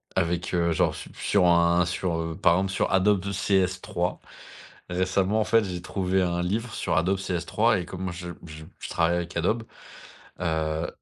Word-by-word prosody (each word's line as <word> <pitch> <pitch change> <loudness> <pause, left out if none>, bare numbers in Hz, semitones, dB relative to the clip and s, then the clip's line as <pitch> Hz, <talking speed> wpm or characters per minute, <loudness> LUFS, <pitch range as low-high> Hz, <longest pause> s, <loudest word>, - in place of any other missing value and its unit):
avec, 85 +1 0
heu, 85 -1 +2
genre - - +2
su - - -9
sur 95 -3 +2
un 85 0 +4
sur, 90 -1 -2
heu, 80 -1 -3
par 85 - +5
exemple 95 +2 0
sur - - 0
Adobe 95 0 +3
de 100 +1 -4
CS3 95 -2 0 0.7
récemment 95 +3 +1
en - - +3
fait, 115 0 +3
j'ai 90 -2 -5
trouvé 95 0 0
un 85 -1 0
livre 110 +5 -2
sur - - -1
Adobe 95 +4 +2
CS3 95 +4 +1
et - - -7
comme 95 0 -5
je 85 0 -7 0.2
je 80 -1 -10
je - - -7
travaille 85 +1 +2
avec 85 0 -4
Adobe, 110 +7 0 0.8
heu 80 -1 -1
90 Hz, 180 wpm, -26 LUFS, 85-95 Hz, 0.8 s, par